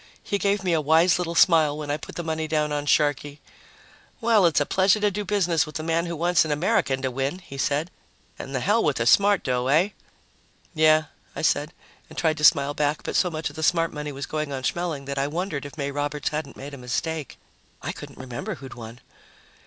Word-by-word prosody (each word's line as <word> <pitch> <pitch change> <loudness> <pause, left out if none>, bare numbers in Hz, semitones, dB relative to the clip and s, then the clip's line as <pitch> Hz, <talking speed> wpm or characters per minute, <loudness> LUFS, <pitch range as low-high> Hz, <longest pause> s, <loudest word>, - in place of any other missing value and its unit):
He 200 - -2
gave 200 -1 +1
me 180 -2 +1
a 160 - +2
wise 165 +4 +4
little 170 -1 -3
smile 160 -4 +4
when 150 -1 -4
I 145 - 0
put - - -11
the 175 - -4
money 160 -1 -2
down 155 -1 0
on 145 0 -2
Sharkey. 145 -1 +1 0.8
"Well, 225 -6 +4
it's 160 - +2
a 145 - +1
pleasure 190 +5 +3
to 210 0 +2
do 205 +2 -3
business 180 -6 +1
with 155 0 -6
a - - -4
man 165 +1 0
who 170 - -4
wants 175 +1 +3
an 160 - -5
American 150 -4 +1
to 130 - -1
win," 135 +6 -2
he 180 -7 -12
said, 145 +6 0 0.5
"and 135 - -6
the 130 - -1
hell 215 - +2
with 150 -3 +1
the 115 - 0
smart 200 +9 +4
dough, 125 -1 -1
eh?" 160 +8 +3 0.8
"Yeah," 155 -1 +4 0.3
I - - -5
said, 150 0 +1 0.4
and - - -14
tried 160 -2 +1
to - - -5
smile 145 -2 +5
back, 150 0 -1
but - - -4
so 180 - +3
much 155 -2 -4
of - - -17
the 160 - -6
smart 165 +1 +2
money 150 -1 -5
was 140 +1 -5
going 155 -2 -3
on 135 -1 -4
Schmeling 160 -2 -2
that 140 0 -3
I 140 - +1
wondered 155 -2 -3
if 145 - -14
May 140 -1 -2
Roberts 145 0 -2
hadn't 150 -3 -5
made 140 +2 -8
a 140 - -8
mistake. 145 +5 -3 0.5
I - - -2
couldn't - - -11
remember 125 -2 -5
who 135 - -11
had 130 - -9
won. 115 +1 -10
155 Hz, 230 wpm, -24 LUFS, 140-170 Hz, 0.8 s, smile